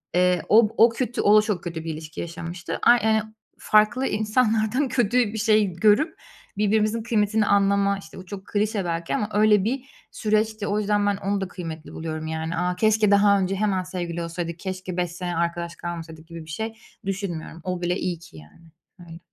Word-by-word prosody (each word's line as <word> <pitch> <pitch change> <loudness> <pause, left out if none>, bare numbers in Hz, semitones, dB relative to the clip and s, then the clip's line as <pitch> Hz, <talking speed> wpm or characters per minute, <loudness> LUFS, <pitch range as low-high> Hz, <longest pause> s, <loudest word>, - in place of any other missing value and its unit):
Iıı, 180 -1 +3
o 220 0 +6
o 230 - +7
kötü, 240 +1 -2
o 210 +1 +6
da - - +7
çok 210 -5 -2
kötü 170 -2 -5
bir 165 - -3
ilişki 155 +1 -7
yaşamıştı. 170 +1 -6
Ay, 240 0 +6
ııı, 220 0 +1 0.3
farklı 215 +5 +3
insanlardan 220 +4 +1
kötü 245 -2 +1 0.2
bir 220 - -4
şey 215 -3 +3
görüp 215 - +2 0.4
birbirimizin 215 +2 +1
kıymetini 215 -2 +1
anlama, 200 0 +3
işte, - - -13
o 185 - -10
çok 195 +1 -8
klişe 210 -1 -1
belki 165 -1 -2
ama 210 - -1
öyle 210 -1 +4
bir 250 +6 0 0.3
süreçti. 215 -1 0
O 205 +1 0
yüzden 205 0 +1
ben 200 -1 +1
onu 200 0 -2
da 190 - -2
kıymetli 165 -3 -8
buluyorum, 155 -1 -5
yani. 160 +1 -3
"A, 180 0 0
keşke 215 0 +3
daha 200 0 +5
önce 190 0 0
hemen 195 -2 0
sevgili 175 -2 -4
olsaydık, 170 0 -5
keşke 185 -1 -5
5 175 -1 -1
sene 175 0 -4
arkadaş 170 0 -2
kalmasaydık." 165 -2 -7
gibi 165 -1 -9
bir 160 - -14
şey 220 +7 -4 0.3
düşünmüyorum. 185 -4 -4
O 180 -1 -3
bile 175 0 0
iyi 175 -4 -3
ki, 120 - -15
yani, 75 - -16 0.3
öyle. 165 -1 -11
195 Hz, 190 wpm, -24 LUFS, 170-215 Hz, 0.4 s, o